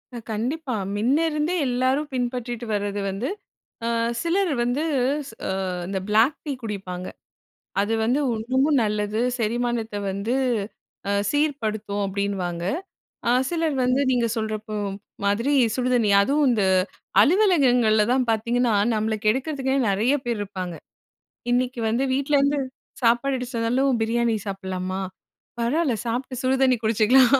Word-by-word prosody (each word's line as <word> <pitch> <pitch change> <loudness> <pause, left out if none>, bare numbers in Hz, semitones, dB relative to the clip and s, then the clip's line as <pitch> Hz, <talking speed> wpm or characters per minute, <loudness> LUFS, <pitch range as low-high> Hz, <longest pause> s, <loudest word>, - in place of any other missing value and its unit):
அ - - -4
கண்டிப்பா. 250 +5 -2 0.2
மின்னேயிருந்தே 300 - +1
எல்லாரும் 260 +4 +1
பின்பற்றிட்டு 245 -1 -3
வரது 205 0 -1
வந்து, 195 +6 -3 0.6
அ - - 0 0.3
சிலர் 355 +1 +1
வந்து 245 +5 0 0.7
அ - - -2 0.4
இந்த 195 -1 -2
பிளாக் 225 +7 +4
டீ 295 - -2
குடிப்பாங்க. 190 -4 -5 0.7
அது 215 +3 0
வந்து 245 +6 +2 0.2
இன்னுமும் 260 +5 +2
நல்லது. 210 0 -1 0.2
செரிமானத்த 235 -1 -1 0.2
வந்து 200 +5 -2 0.8
அ - - +2 0.2
சீர்படுத்தும் 220 -9 -1
அப்பிடின்னுவாங்க. 190 -3 -2 0.7
அ - - +4 0.2
சிலர் 325 -4 0
வந்து 255 +2 +2
நீங்க 245 -2 +2
சொல்றப்போ, 215 -1 -3 0.5
மாதிரி 230 +8 +1 0.2
சுடுதண்ணி 250 -4 +2
அதுவும் 285 +7 +2
இந்த 215 -5 +2 0.6
அலுவலகங்கள்ல 265 - +4
தான் 255 -1 +1
பார்த்தீங்கன்னா, 235 +2 +1 0.2
நம்மள 220 +1 0
கெடுக்கிறதுக்னே 265 +3 +1
நிறைய 215 +7 +2
பேர் 235 -3 -1
இருப்பாங்க. 185 -3 -5 0.8
இன்னிக்கி 250 0 0
வந்து 235 +5 +1
வீட்லேருந்து 280 +1 +2 0.4
சாப்பாடு 240 +4 +3
எடுத்துட்டு 250 -2 -4
வந்தாலும் 250 +3 +2
பிரியாணி 235 +1 +1
சாப்பிட்லாமா? 190 -1 -4 0.6
பரவால்ல. 265 +2 +1
சாப்ட்டு 250 +2 -3
சுடுதண்ணி 260 0 +3
குடிச்சிக்கலாம். 230 +4 +5
240 Hz, 115 wpm, -24 LUFS, 215-265 Hz, 0.8 s, குடிச்சிக்கலாம்